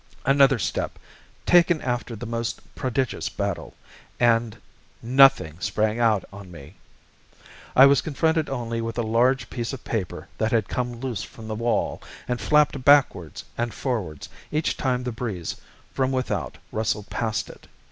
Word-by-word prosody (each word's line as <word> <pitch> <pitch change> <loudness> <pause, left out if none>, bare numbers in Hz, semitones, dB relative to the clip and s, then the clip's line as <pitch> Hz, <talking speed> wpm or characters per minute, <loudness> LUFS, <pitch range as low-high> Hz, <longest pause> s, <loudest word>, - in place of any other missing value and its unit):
Another 135 0 +5
step - - -2 0.5
taken 175 -2 +5
after 120 -3 -3
the 110 - -7
most 115 0 -3
prodigious 130 0 -2
battle - - -4 0.4
and 115 -2 +2 0.5
NOTHING 125 - +5
sprang 110 +5 0
out 110 -4 +2
on 100 -2 -10
me. 80 -4 -12 1.0
I 135 - +9
was 140 -1 +5
confronted 160 +1 0
only 115 -3 -3
with 115 0 -4
a 120 - +1
large 125 +4 +2
piece 120 +1 -3
of 130 - -7
paper 105 -7 -4
that 110 0 +1
had 110 -4 +2
come 120 -2 -3
loose 125 -7 -3
from 110 -1 -10
the 110 - -3
wall, 115 +2 -1 0.3
and 125 -2 -2
flapped 150 -1 +3
backwards 125 - +3
and 120 -1 -2
forwards 100 - -3 0.2
each 155 +1 0
time 125 -2 -1
the 125 - -3
breeze 110 -8 -4 0.4
from 130 -1 0
without 130 -1 -2
rustled 110 -1 -2
past 110 -2 -1
it. - - -17
120 Hz, 150 wpm, -24 LUFS, 110-135 Hz, 1.0 s, I